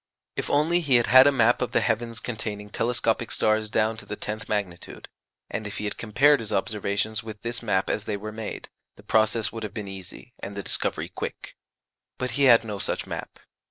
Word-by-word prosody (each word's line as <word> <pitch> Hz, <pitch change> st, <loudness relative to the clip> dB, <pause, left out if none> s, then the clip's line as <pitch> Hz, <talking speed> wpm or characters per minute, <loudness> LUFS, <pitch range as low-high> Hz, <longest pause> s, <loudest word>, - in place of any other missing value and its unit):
If -, -, -3 dB
only 160 Hz, +5 st, +3 dB
he 140 Hz, -6 st, +3 dB
had 120 Hz, -1 st, +5 dB
had 130 Hz, +2 st, +8 dB
a -, -, +6 dB
map 120 Hz, -3 st, +3 dB
of 125 Hz, -1 st, -2 dB
the -, -, +4 dB
heavens 115 Hz, 0 st, -1 dB
containing 105 Hz, -3 st, -5 dB
telescopic 115 Hz, -1 st, 0 dB
stars 110 Hz, 0 st, +1 dB
down 110 Hz, +1 st, +1 dB
to -, -, -9 dB
the -, -, -4 dB
tenth 110 Hz, +1 st, -5 dB
magnitude, 100 Hz, -5 st, -4 dB, 0.4 s
and 110 Hz, -, -4 dB
if 100 Hz, -, -7 dB
he -, -, -4 dB
had 105 Hz, -, -2 dB
compared 135 Hz, +6 st, +4 dB
his 110 Hz, -2 st, -6 dB
observations 105 Hz, +1 st, -1 dB
with 110 Hz, -2 st, -9 dB
this 120 Hz, 0 st, -2 dB
map 100 Hz, -5 st, +1 dB
as 105 Hz, -, -1 dB
they 105 Hz, -1 st, -2 dB
were 105 Hz, +2 st, -6 dB
made, 110 Hz, 0 st, -6 dB, 0.3 s
the -, -, -16 dB
process 110 Hz, -1 st, +2 dB
would 115 Hz, -, -6 dB
have 105 Hz, -2 st, -6 dB
been 105 Hz, -2 st, -4 dB
easy, 95 Hz, +5 st, -10 dB
and 100 Hz, +1 st, -7 dB
the 100 Hz, -, -3 dB
discovery -, -, -2 dB
quick. -, -, -6 dB, 0.6 s
But 130 Hz, -1 st, -2 dB
he 140 Hz, +3 st, +2 dB
had 115 Hz, -3 st, +7 dB
no 105 Hz, -3 st, -5 dB
such -, -, 0 dB
map. -, -, -6 dB
110 Hz, 210 wpm, -26 LUFS, 105-120 Hz, 0.6 s, had